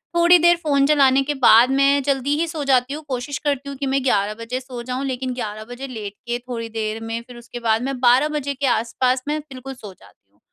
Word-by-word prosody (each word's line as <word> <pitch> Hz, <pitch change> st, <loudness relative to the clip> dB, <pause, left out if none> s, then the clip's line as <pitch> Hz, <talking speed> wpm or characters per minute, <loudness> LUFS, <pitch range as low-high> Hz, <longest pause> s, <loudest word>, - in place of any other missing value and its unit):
थोड़ी 345 Hz, +1 st, +6 dB
देर 345 Hz, +1 st, +5 dB
फ़ोन 280 Hz, -3 st, +2 dB
चलाने 275 Hz, -3 st, +4 dB
के 295 Hz, +2 st, -2 dB
बाद 250 Hz, -3 st, +6 dB
मैं 275 Hz, +1 st, +3 dB
जल्दी 280 Hz, +1 st, 0 dB
ही 335 Hz, -, 0 dB
सो 315 Hz, -2 st, -4 dB
जाती 260 Hz, -1 st, +2 dB
हूँ 305 Hz, +1 st, -7 dB
कोशिश 260 Hz, +2 st, -4 dB
करती 280 Hz, -1 st, -1 dB
हूँ 280 Hz, -, -7 dB
कि 280 Hz, -, -3 dB
मैं 270 Hz, 0 st, 0 dB
11 210 Hz, -5 st, +1 dB
बजे 250 Hz, +3 st, -3 dB
सो 250 Hz, -2 st, -8 dB
जाऊँ 255 Hz, +2 st, -4 dB
लेकिन 260 Hz, -1 st, -3 dB
11 215 Hz, -3 st, -5 dB
बजे 265 Hz, +3 st, -7 dB
लेट 215 Hz, -6 st, -7 dB
के 240 Hz, 0 st, -2 dB
थोड़ी 230 Hz, -2 st, -5 dB
देर 220 Hz, -1 st, -3 dB
में 225 Hz, +1 st, -4 dB
फिर 245 Hz, -1 st, -12 dB
उसके 240 Hz, 0 st, -9 dB
बाद 225 Hz, -1 st, +1 dB
मैं 270 Hz, -1 st, -3 dB
12 250 Hz, +4 st, +4 dB
बजे 285 Hz, -1 st, -3 dB
के 280 Hz, +1 st, -3 dB
आस-पास 250 Hz, +2 st, 0 dB
मैं 300 Hz, +1 st, -1 dB
बिल्कुल 270 Hz, -3 st, -9 dB
सो 210 Hz, -6 st, -11 dB
जाती 100 Hz, -, -23 dB
हूँ। 100 Hz, -, -36 dB
260 Hz, 240 wpm, -21 LUFS, 240-280 Hz, -, थोड़ी